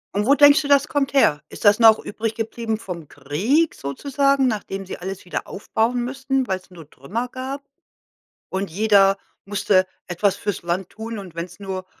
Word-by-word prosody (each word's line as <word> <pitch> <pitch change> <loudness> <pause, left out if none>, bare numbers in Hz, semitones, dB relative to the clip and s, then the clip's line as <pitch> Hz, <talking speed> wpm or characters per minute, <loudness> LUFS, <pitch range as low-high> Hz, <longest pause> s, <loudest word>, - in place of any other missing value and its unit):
Und 205 +1 +1
wo 275 - +5
denkst 290 +2 +7
du, 285 - -4
das 285 +1 +4
kommt 280 -1 -1
her? 150 - +3
Ist - - -9
das 205 0 +7
noch 220 -1 +7
übrig 225 +1 -4
geblieben 225 0 -3
vom 170 -7 -7
Krieg 195 - 0
sozusagen, 275 - +1
nachdem 195 -4 -3
sie - - -6
alles 190 +1 -6
wieder 180 - -4
aufbauen 230 +4 -1
müssten, 265 +1 -1
weil's 190 0 -4
nur 165 -4 -13
Trümmer 215 - -4
gab 265 +3 -6 0.9
und 190 0 -3
jeder 195 +1 +4 0.3
musste 200 -2 +2 0.2
etwas 190 +3 0
fürs 205 -4 -3
Land 175 +2 -2
tun 225 0 -7
und 185 -4 -9
wenn 170 +1 -4
es 180 - -17
nur 190 -2 -5
210 Hz, 180 wpm, -22 LUFS, 185-255 Hz, 0.9 s, denkst